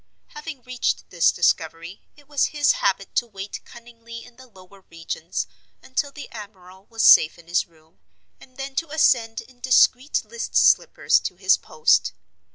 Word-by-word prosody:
Having 325 - -9
reached 250 0 -3
this 170 -2 +3
discovery, 165 +1 -1 0.2
it 290 -2 -21
was 285 -2 +1
his 295 -2 +2
habit 195 0 -1
to 240 - 0
wait 200 -2 -8
cunningly 230 -1 -12
in 245 -1 -18
the 260 +1 -16
lower 190 -2 -18
regions 165 0 -5 0.4
until 280 +2 -3
the 290 +1 -10
admiral 190 -3 -12
was 225 -1 -2
safe 155 - +6
in 170 -1 -18
his 175 +2 0
room, 160 -1 -28 0.4
and 255 -1 -19
then 270 0 -6
to 330 -1 -2
ascend 245 -7 +1
in 250 -1 -20
discreet 255 +2 +2
list 470 - -7
slippers - - +3
to - - -6
his - - +3
post. 460 - +1
230 Hz, 165 wpm, -23 LUFS, 185-270 Hz, 0.4 s, safe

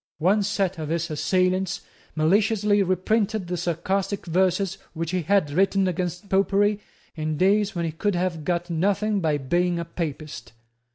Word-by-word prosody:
One 190 +7 +3
set 195 -3 -1
of 155 -1 -4
his 165 0 -1
assailants 185 +3 0 0.3
maliciously 205 +5 +3
reprinted 200 +3 0
the 180 +1 -3
sarcastic 180 +4 -2
verses 185 +2 +1
which 165 0 -3
he 185 -1 0
had 170 -2 +2
written 195 +3 +2
against 180 +2 -3
Popery 200 +2 +2 0.4
in 155 -1 -2
days 200 +3 +2
when 170 -1 -1
he 165 - -2
could 195 +5 -1
have 175 -3 -1
got 175 +2 -1
nothing 200 +5 +1
by 155 -4 +1
being 175 +6 0
a 170 - -3
Papist. 150 -8 -6
180 Hz, 155 wpm, -24 LUFS, 165-195 Hz, 0.4 s, One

